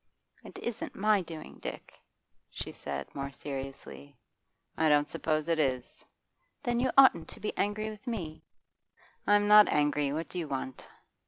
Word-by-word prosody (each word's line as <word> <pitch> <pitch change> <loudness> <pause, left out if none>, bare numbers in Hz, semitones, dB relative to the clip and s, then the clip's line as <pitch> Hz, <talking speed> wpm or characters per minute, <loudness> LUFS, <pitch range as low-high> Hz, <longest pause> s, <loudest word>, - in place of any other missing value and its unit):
'It - - -11
isn't 235 -2 -5
my 210 0 +3
doing, 165 -3 -9
Dick,' - - -8 0.5
she - - -6
said 70 0 -5
more 140 0 -4
seriously. 135 0 -7 0.6
'I 160 0 +3
don't 145 0 +4
suppose 155 -1 -1
it 165 -1 +1
is.' 130 -4 -1 0.6
'Then 240 -1 0
you 255 +1 +2
oughtn't 270 -1 +7
to - - -11
be 210 - -3
angry 210 +1 -1
with 215 +3 -13
me.' 170 -10 -4 0.8
'I'm 205 0 +4
not 210 0 +8
angry. 145 -1 +2
What 160 +3 -3
do 180 - -5
you 165 - -3
want? 130 -2 -5
160 Hz, 155 wpm, -30 LUFS, 140-210 Hz, 0.8 s, not